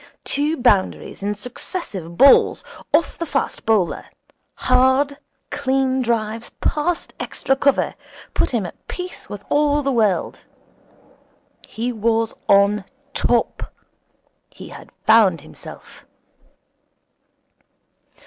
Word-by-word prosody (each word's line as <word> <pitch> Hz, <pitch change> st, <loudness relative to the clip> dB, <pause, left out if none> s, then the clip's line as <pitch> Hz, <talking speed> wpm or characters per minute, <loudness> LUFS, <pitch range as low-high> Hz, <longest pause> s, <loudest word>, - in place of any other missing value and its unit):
Two 300 Hz, +3 st, -1 dB
boundaries 210 Hz, -8 st, +1 dB
in 205 Hz, +1 st, -1 dB
successive 205 Hz, -, -6 dB
balls 275 Hz, 0 st, +6 dB, 0.3 s
off 325 Hz, +2 st, +1 dB
the 335 Hz, -, -2 dB
fast 275 Hz, -5 st, -2 dB
bowler, 210 Hz, -6 st, +1 dB, 0.5 s
hard, 260 Hz, +3 st, +2 dB, 0.3 s
clean 265 Hz, 0 st, 0 dB
drives 230 Hz, -1 st, -2 dB
past 325 Hz, +3 st, -1 dB
extra 270 Hz, -, -1 dB
cover, 280 Hz, +1 st, +2 dB, 0.4 s
put -, -, +1 dB
him 230 Hz, -6 st, -1 dB
at 175 Hz, -, -11 dB
peace 360 Hz, 0 st, -7 dB
with 205 Hz, -1 st, -7 dB
all 290 Hz, 0 st, +2 dB
the 275 Hz, -, 0 dB
world. 215 Hz, -6 st, +1 dB, 1.3 s
He 235 Hz, +3 st, -3 dB
was 225 Hz, 0 st, 0 dB, 0.2 s
on 200 Hz, +1 st, +4 dB, 0.3 s
top. 240 Hz, -1 st, 0 dB, 0.8 s
He -, -, -12 dB
had -, -, -12 dB, 0.2 s
found 210 Hz, -8 st, +5 dB
himself. 155 Hz, -, -13 dB
240 Hz, 100 wpm, -21 LUFS, 210-275 Hz, 1.3 s, balls